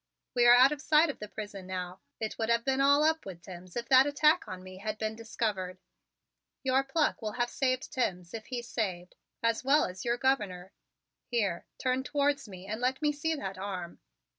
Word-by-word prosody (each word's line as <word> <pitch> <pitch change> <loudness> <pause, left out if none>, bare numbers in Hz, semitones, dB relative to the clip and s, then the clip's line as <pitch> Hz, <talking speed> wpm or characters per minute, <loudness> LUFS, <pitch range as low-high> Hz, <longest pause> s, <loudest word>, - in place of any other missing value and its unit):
We 240 -1 +4
are 240 - +10
out 260 +3 +7
of 295 -1 -4
sight 310 0 +4
of - - -16
the 210 - -6
prison 205 -3 -7
now. 180 0 -5 0.2
It 220 -1 -3
would 225 0 -1
have 235 0 +3
all - - -31
been 270 +1 +1
up 300 +3 +4
with 180 -3 -9
Timms 180 -1 -11
if 235 -1 -3
that 265 +1 +7
attack 300 +3 +4
upon 185 0 -8
me 185 0 -10
had 215 +1 -4
been 220 0 -2
discovered. 215 -5 -3 0.9
Your 265 0 +3
pluck 295 +1 0
will 215 -1 -3
have 240 -1 -1
saved 255 +1 -1
Timms, 180 - -2
if 225 -1 -7
he's 240 -2 -5
saved, 185 -7 -3 0.3
as 230 +1 +1
well 280 +3 +4
as 185 0 -7
your 240 0 0
Governor. 205 -9 -1 0.5
Here, 205 -8 -1
turn 255 0 0
towards 285 -3 0
me 185 -1 -10
and 215 +4 -4
let 255 +1 +1
me 295 - +3
see 315 +2 -1
that 195 -10 -5
arm." 185 -3 -5
235 Hz, 205 wpm, -30 LUFS, 190-270 Hz, 0.9 s, are